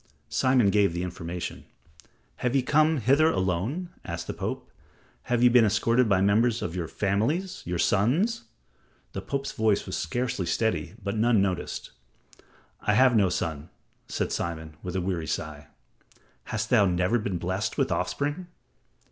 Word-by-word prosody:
Simon 130 -6 +3
gave 100 -4 +3
the 90 - -2
information. 90 0 -5 0.7
"Have 125 +1 -1
ye 135 - +3
come 155 +3 +3
hither 140 +6 +4
alone?" 95 - -1
asked - - -5
the - - -4
Pope. - - -4
"Or - - -31 0.5
have 120 0 +1
ye 125 - +8
been 120 -1 +6
escorted 115 +3 +2
by 95 -2 +3
members 110 +4 +2
of 85 - -4
your 85 -3 -3
families 115 - -1
your 90 0 -1
sons?" 125 - +1 0.7
The 95 - -4
Pope's 135 +7 -3
voice 110 -2 +1
was 95 - -4
scarcely 120 +1 -2
steady, 110 +4 -1
but 100 +2 -2
none 115 0 +3
noticed. 95 -2 -2 0.9
"I 105 - +1
have 130 0 +5
no 100 -4 +4
son," 80 -2 -3 0.4
said - - -2
Simon, 80 -2 -4
with 90 0 -5
a 95 - 0
weary 90 -3 -2
sigh. 75 -1 -4 0.8
"Hast 110 0 -3
thou 110 -5 +6
never 90 +6 +1
been 100 -4 -2
blessed 95 +5 -2
with - - +1
offspring?" 145 +5 -2
105 Hz, 155 wpm, -27 LUFS, 90-125 Hz, 0.9 s, ye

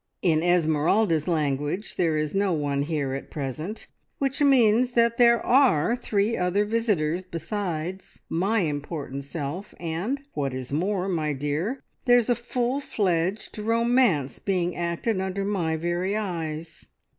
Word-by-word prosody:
"In 160 -3 +3
Esmeralda's 165 0 +2
language, 150 +3 -1
there 165 -3 +1
is 150 -1 -1
no 195 -1 +1
one 145 -3 0
here 145 -3 -1
at 135 - -6
present, 155 - -5 0.3
which 270 0 -1
means 250 -3 +4
that 235 0 +2
there 235 -1 +6
are 240 - +4
three 220 -2 0
other 180 +3 +1
visitors 200 -7 0
besides 180 0 -4
my 195 +6 +1
important 145 -3 -4
self, 165 +6 -5
and, 175 +11 -2
what 135 -3 -2
is 130 +1 -5
more, 185 +4 0
my 155 -5 0
dear, 150 - -2 0.2
there's 245 -2 +4
a - - +5
full 245 +2 -1
fledged 190 -5 -1
romance 230 - +2
being 180 -3 -1
acted 175 +4 -1
under 190 +1 -2
my 175 -6 0
very 175 +5 -1
eyes. 165 -5 -5
180 Hz, 135 wpm, -25 LUFS, 155-220 Hz, 0.3 s, there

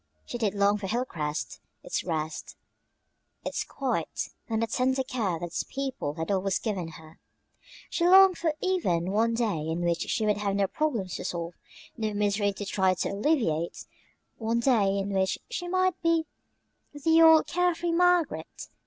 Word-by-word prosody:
She 240 - -5
did 210 -3 0
long 200 +1 +3
for 195 - -4
Hilcrest, 155 - -3 0.2
its - - -2
rest, 155 -2 -4 0.9
its - - -2
quiet, - - -3 0.2
and 225 0 0
the - - +3
tender 260 +3 0
care 220 -9 -2
that 175 - -4
its 170 - -3
people 265 - -4
had 165 +4 -3
always 195 -1 +1
given 195 -7 -3
her. 160 0 -16 0.7
She 340 - +1
longed 380 0 +7
for 320 -3 0
even 185 - 0
one 230 +3 +2
day 225 -8 0
in 165 +2 -2
which 170 0 0
she 220 - 0
would 210 -1 +2
have 200 -1 -1
no 200 0 +2
problems 225 - -2
to - - -6
solve, 170 0 -4 0.4
no 215 -2 -2
misery 205 0 +1
to 200 +1 -6
try 190 -2 +2
to - - -2
alleviate 200 - 0 0.5
one 230 +1 0
day 215 -6 +3
in 200 0 -2
which 190 0 +1
she 355 -7 -3
might 370 0 +1
be 330 -1 +2 0.7
the 320 +3 +3
old 320 -1 +7
care 355 -1 +1
free 340 +1 -2
Margaret. 355 -2 +1
210 Hz, 170 wpm, -28 LUFS, 185-305 Hz, 0.9 s, longed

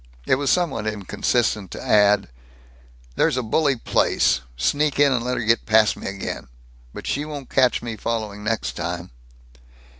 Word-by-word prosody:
It - - +2
was 140 +1 +1
somewhat 140 -12 +1
inconsistent 105 0 -1
to - - -8
add, 105 -3 +4 0.9
"There's - - +2
a 125 - 0
bully 140 +5 +2
place 85 - +1 0.2
sneak 145 - +1
in 145 -1 +5
and 125 -3 0
let 125 +1 -1
her - - -2
get 115 +1 +1
past 110 -1 +4
me - - -7
again. 100 -1 -5 0.4
But - - -9
she 145 - -1
won't 145 -3 -8
catch 125 -3 +3
me 115 -2 -4
following 105 -3 -3
next 110 +1 -1
time!" 85 +1 -5
115 Hz, 160 wpm, -22 LUFS, 105-135 Hz, 0.9 s, in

